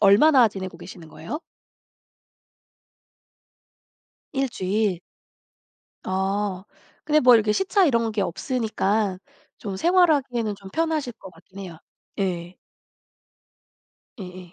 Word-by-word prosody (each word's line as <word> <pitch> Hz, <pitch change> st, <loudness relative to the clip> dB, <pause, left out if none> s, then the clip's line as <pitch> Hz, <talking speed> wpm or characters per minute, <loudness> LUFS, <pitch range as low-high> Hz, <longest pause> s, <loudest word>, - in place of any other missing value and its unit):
얼마나 230 Hz, +5 st, +6 dB
지내고 190 Hz, -4 st, -7 dB
계시는 175 Hz, -3 st, -11 dB
거예요? 175 Hz, -, -7 dB, 2.9 s
1 270 Hz, -1 st, 0 dB
주일. 195 Hz, -3 st, -1 dB, 1.0 s
아. 190 Hz, 0 st, -1 dB, 0.4 s
근데 305 Hz, 0 st, +3 dB
뭐 250 Hz, -1 st, +7 dB
이렇게 215 Hz, -2 st, +3 dB
시차 385 Hz, -, +2 dB
이런 230 Hz, -6 st, +2 dB
게 210 Hz, -, -1 dB
없으니까 210 Hz, -1 st, -1 dB, 0.4 s
좀 195 Hz, -2 st, -5 dB
생활하기에는 285 Hz, -, +2 dB
좀 195 Hz, -1 st, -12 dB
편하실 315 Hz, -5 st, -1 dB
것 190 Hz, -4 st, -12 dB
같긴 185 Hz, +3 st, -17 dB
해요. 170 Hz, -4 st, -8 dB, 0.4 s
예. 180 Hz, -2 st, -3 dB, 1.6 s
예예. 180 Hz, -2 st, -9 dB
205 Hz, 200 characters per minute, -24 LUFS, 185-255 Hz, 2.9 s, 뭐